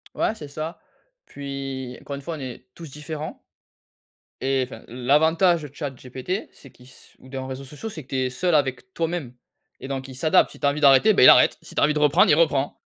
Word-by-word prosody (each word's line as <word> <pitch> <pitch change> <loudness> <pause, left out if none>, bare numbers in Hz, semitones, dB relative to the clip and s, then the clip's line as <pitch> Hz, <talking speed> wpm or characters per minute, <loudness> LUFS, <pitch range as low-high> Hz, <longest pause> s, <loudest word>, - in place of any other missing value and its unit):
Ouais, - - 0
c'est 150 - -9
ça. 155 +4 -6 0.5
Puis, 135 -2 -6
encore 140 - -6
une 140 - -8
fois, 165 +3 -5
on - - -9
est 130 -1 -8
tous 165 -3 -10
différents. 150 +2 -7 1.0
Et, 135 0 +1
enfin, 130 - -12
l'avantage 160 +7 +2
de 145 - -7
chat 145 -3 -4
GPT, 130 - -5
c'est 135 - -16
qu'il 125 - -19
s 130 - -18
ou 130 - -16
d'un 130 -1 -5
réseaux 135 +1 -7
sociaux, 150 +11 -8
c'est 160 -8 -8
que - - -29
tu 135 - -4
es 130 -1 0
seul 175 +6 0
avec 145 +6 -1
toi-même 165 -6 -3 0.5
et 130 - -6
donc 135 -1 -4
il 130 - -10
s'adapte. 155 +4 +3
Si - - -14
tu - - -2
as - - +5
envie 145 +1 -2
d'arrêter, 140 +10 +6
ben, - - +4
il - - +11
arrête, - - +6
si - - -14
tu - - +1
as - - +4
envie 150 +1 +3
de 150 - -1
reprendre, 150 +5 +4
il 150 - +6
reprend. 145 -4 +1
140 Hz, 235 wpm, -23 LUFS, 130-160 Hz, 1.0 s, il